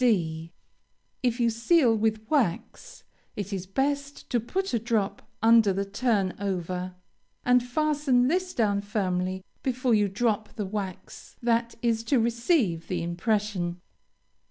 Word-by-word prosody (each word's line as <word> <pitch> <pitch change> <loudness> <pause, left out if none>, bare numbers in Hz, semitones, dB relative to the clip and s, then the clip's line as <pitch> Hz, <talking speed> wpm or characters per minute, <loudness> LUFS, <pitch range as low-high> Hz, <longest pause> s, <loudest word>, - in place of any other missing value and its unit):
D. 165 -8 +1 0.7
If 245 -1 0
you 235 -1 +3
seal 235 +2 +3
with 220 0 0
wax, 280 - -1 0.3
it 200 0 -4
is 185 -1 -4
best 280 +6 -2
to 245 - +3
put 375 - -3
a 235 - +2
drop 215 -3 -1 0.2
under 225 -2 +6
the 195 +1 -1
turn 205 -2 0
over, 185 -2 -3 0.5
and 250 0 +5
fasten 270 -1 +1
this 365 +4 0
down 205 -3 +2
firmly 190 -3 -2 0.2
before 255 -1 0
you 210 -2 +4
drop 215 +1 -1
the 210 - -3
wax 195 -2 -6
that 235 0 +1
is 230 -1 +1
to 265 +1 +3
receive 235 - +1
the 175 -2 -2
impression. 180 0 -1
220 Hz, 135 wpm, -27 LUFS, 195-245 Hz, 0.7 s, under